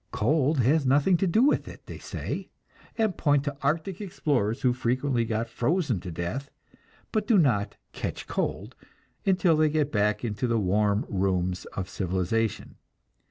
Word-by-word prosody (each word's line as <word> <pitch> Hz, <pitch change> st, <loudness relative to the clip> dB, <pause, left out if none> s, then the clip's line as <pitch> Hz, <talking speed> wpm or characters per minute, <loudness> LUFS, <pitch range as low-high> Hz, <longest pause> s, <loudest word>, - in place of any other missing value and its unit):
Cold 145 Hz, +4 st, +2 dB
has 145 Hz, +6 st, +3 dB
nothing 140 Hz, +7 st, +4 dB
to 190 Hz, -, +1 dB
do 215 Hz, +8 st, +3 dB
with 290 Hz, -, +2 dB
it, -, -, -11 dB
they -, -, -9 dB
say, -, -, -5 dB, 0.5 s
and 220 Hz, -5 st, +1 dB
point 145 Hz, -2 st, +2 dB
to 145 Hz, -1 st, -3 dB
arctic 165 Hz, +7 st, -1 dB
explorers 135 Hz, -, -1 dB
who 125 Hz, -2 st, +4 dB
frequently 125 Hz, 0 st, 0 dB
get 115 Hz, 0 st, -2 dB
frozen 135 Hz, -, 0 dB
to 90 Hz, -, -7 dB
death, 85 Hz, -, -4 dB, 0.6 s
but 215 Hz, -2 st, -1 dB
do 225 Hz, -, +5 dB
not 105 Hz, -, +2 dB, 0.2 s
"catch -, -, -5 dB
cold" -, -, -3 dB, 0.5 s
until 185 Hz, -3 st, +4 dB
they 155 Hz, 0 st, +3 dB
get 150 Hz, -1 st, 0 dB
back 105 Hz, +1 st, +1 dB
into 110 Hz, +3 st, -2 dB
the 115 Hz, -1 st, +1 dB
warm 105 Hz, +1 st, +1 dB
rooms 95 Hz, -2 st, -1 dB
of 95 Hz, -1 st, -4 dB
civilization. 95 Hz, +4 st, -2 dB
125 Hz, 160 wpm, -27 LUFS, 105-155 Hz, 0.6 s, do